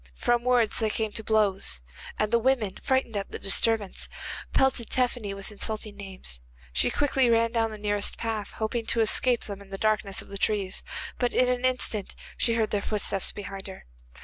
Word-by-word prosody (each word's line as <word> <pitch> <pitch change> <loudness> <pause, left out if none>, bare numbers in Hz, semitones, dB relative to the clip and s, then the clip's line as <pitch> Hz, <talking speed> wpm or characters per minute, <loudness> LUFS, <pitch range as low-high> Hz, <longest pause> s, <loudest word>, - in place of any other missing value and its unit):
From 240 - +1
words 245 -3 +3
they 220 -1 +1
came 220 0 -1
to 220 - -4
blows, 200 - +1 0.3
and 215 0 0
the 235 - +5
women, 230 -6 +1
frightened 260 -4 +1
at 200 -1 -2
the - - -4
disturbance, 205 +1 +2 0.4
pelted 265 -4 +2
Tephany 245 -5 0
with 195 +1 -7
insulting 215 0 -1
names. 190 - -7 0.3
She 60 - +3
quickly 270 -3 +2
ran 230 0 +3
down 225 -1 +1
the 215 - -7
nearest 205 -1 +1
path, 220 -2 -3
hoping 225 +1 -2
to 230 - +2
escape 240 +2 +3
them 200 -1 -7
in 200 - -14
the 195 - -5
darkness 210 -2 0
of - - -5
the 200 0 -5
trees, 200 -3 0 0.4
but 245 -1 0
in 250 - +4
an 250 0 0
instant 245 -5 -1 0.2
she 230 -2 +2
heard 220 -2 +1
their 205 - +1
footsteps 200 -2 0
behind 195 -1 -7
her. 190 - -10
215 Hz, 190 wpm, -27 LUFS, 200-235 Hz, 0.4 s, the